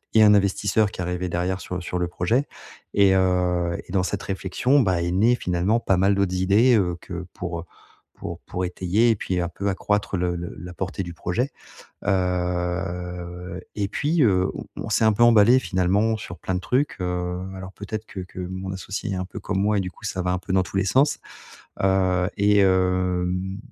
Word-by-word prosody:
et 110 - +8
un 105 - +7
investisseur 100 +1 +2
qui 90 - -7
arrivait 90 0 -2
derrière 90 +2 -1
sur 90 0 -5
sur 90 +1 -3
le 90 - 0
projet 115 +10 0 0.5
et 100 -1 +5
heu 90 -2 +1
et - - -10
dans 95 -1 +2
cette 100 +2 -3
réflexion, 100 +9 +1
bah, 95 -7 +2
est 85 - -1
née 110 +7 +4
finalement 90 +4 0
pas 95 -5 +1
mal 95 +2 +3
d'autres 100 -2 +1
idées, 100 +7 +4
heu, 90 -2 0
que 90 -1 -7
pour, 90 -1 -4
heu, - - -7 0.5
pour 85 0 -7
pour 90 0 -2
étayer 95 +6 +2
et - - +2
puis 95 -2 -2
un 85 -1 -1
peu 100 +3 -3
accroître 100 0 -1
le 90 0 0
le 85 0 -6
la 90 +2 -8
portée 95 +1 -3
du 85 -1 -7
projet. 105 - -2 0.5
Heu 90 -1 -2
et 100 -2 -1
puis, 150 +9 +1
heu, 95 -5 +3
on - - -7 0.2
on - - -4
s'est 110 +1 +2
un 110 - +5
peu 120 +3 +4
emballés 120 +2 +6
finalement 100 +1 +1
sur 90 -4 -8
plein 95 - -3
de 90 - -1
trucs, 135 +8 0
heu, 90 0 -2 0.2
alors 95 0 -8
peut-être 110 +2 -6
que 95 - -7
que 90 0 -10
mon 95 +1 -5
associé 100 +2 -5
est - - -2
un 90 - -2
peu 90 - -8
comme 95 -1 -2
moi 105 +1 +2
et - - +2
du 90 - -3
coup - - -18
ça 90 - -2
va 90 - -1
un 90 - 0
peu 95 +1 -5
dans 95 0 +4
tous 90 - -7
les 95 - +2
sens. 135 +9 +3 0.6
Heu, 95 -2 +2
et 105 +1 +4
hem 90 0 +1
95 Hz, 210 wpm, -24 LUFS, 90-100 Hz, 0.6 s, et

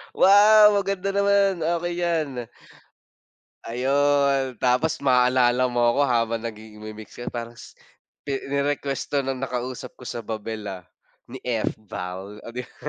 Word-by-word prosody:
Wow, 210 +1 +7
maganda 195 0 -2
naman. 200 -2 +2
Okey 170 +2 -1
'yan. 165 -4 0 1.4
Ayon 135 +1 +1
tapos 140 +6 +1
maaalala 125 -1 +3
mo 120 -1 0
ako 140 - 0
habang 115 -2 0
nagigi 110 -1 -9
nagmi-mix 110 0 -9
ka, 120 - -7
parang 120 0 -6 0.7
ni 140 - 0 0.2
ni-request 140 -1 -1
'to 145 - +1
no'ng 135 0 -3
nakausap 125 0 -5
ko 125 - -12
sa 120 - -5
Babel 110 0 -5
ah, 90 -2 -8 0.5
ni 130 - -7
Fval 105 -4 -4
oh - - -6
'di 125 - -3
ba. - - -17
130 Hz, 135 wpm, -24 LUFS, 115-155 Hz, 1.4 s, Wow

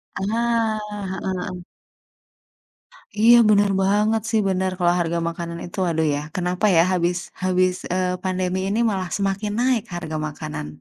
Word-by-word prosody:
Ah, 225 +2 0 0.3
heeh 190 0 -4
heeh. 180 -1 -4 1.5
Iya 225 +3 +6
bener 205 -1 +4
banget 210 +3 +2
sih, 225 -1 +2
bener. 190 0 0
Kalau 175 -1 +3
harga 170 0 0
makanan 170 0 -6
itu 175 - -7
aduh 160 -1 0
ya, - - -2 0.2
kenapa 180 +2 -1
ya 165 - +7
habis 175 -1 +1 0.3
habis, 185 0 +2 0.2
eee, 180 0 -1
pandemi 185 0 -1
ini 205 +3 0
malah 190 -3 -2
semakin 200 +1 -1
naik 250 -3 +2
harga 160 -2 -4
makanan. 75 - -6
185 Hz, 145 wpm, -22 LUFS, 175-210 Hz, 1.5 s, ya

